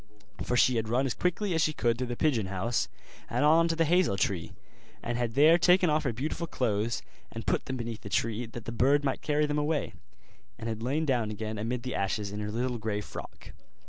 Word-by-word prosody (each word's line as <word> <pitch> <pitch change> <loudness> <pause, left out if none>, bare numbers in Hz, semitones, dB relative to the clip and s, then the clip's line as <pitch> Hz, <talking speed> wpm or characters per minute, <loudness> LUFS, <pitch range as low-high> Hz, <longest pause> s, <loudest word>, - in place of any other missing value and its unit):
For 125 - 0
she 125 0 +4
had 110 -1 -1
run 125 +4 +2
as 130 - 0
quickly 180 - -1
as 160 - +2
she 155 - +2
could 120 -4 0
through 125 - -1
the 120 - -3
pigeon 120 -8 +1
house 100 +5 -1 0.4
and 145 - +1
on 165 +2 +5
to 165 - 0
the 165 0 +2
hazel 175 - +3
tree, 90 -3 -1 0.5
and 120 - -2
had 120 -2 -2
there 155 +5 +6
taken 180 -1 +5
off 155 0 +1
her 130 - +1
beautiful 150 +8 -3
clothes, 110 - -1 0.3
and 115 -1 -7
put - - 0
them 130 - -3
beneath 115 -2 -5
the 100 - -8
tree, 115 +3 -1
that 115 0 -9
the - - -4
bird 135 +5 +3
might 135 -2 -1
carry 150 0 +1
them 150 0 0
away, 150 0 -1 0.6
and 115 - -6
had 110 -1 -3
lain 140 +7 0
down 120 -6 +1
again 110 0 -4
amid 120 +3 -2
the 130 - -3
ashes 100 +1 -1
in 105 - -5
her 105 0 -3
little 120 +2 -2
grey 105 -1 -2
frock. 105 - -9
120 Hz, 230 wpm, -29 LUFS, 110-150 Hz, 0.6 s, there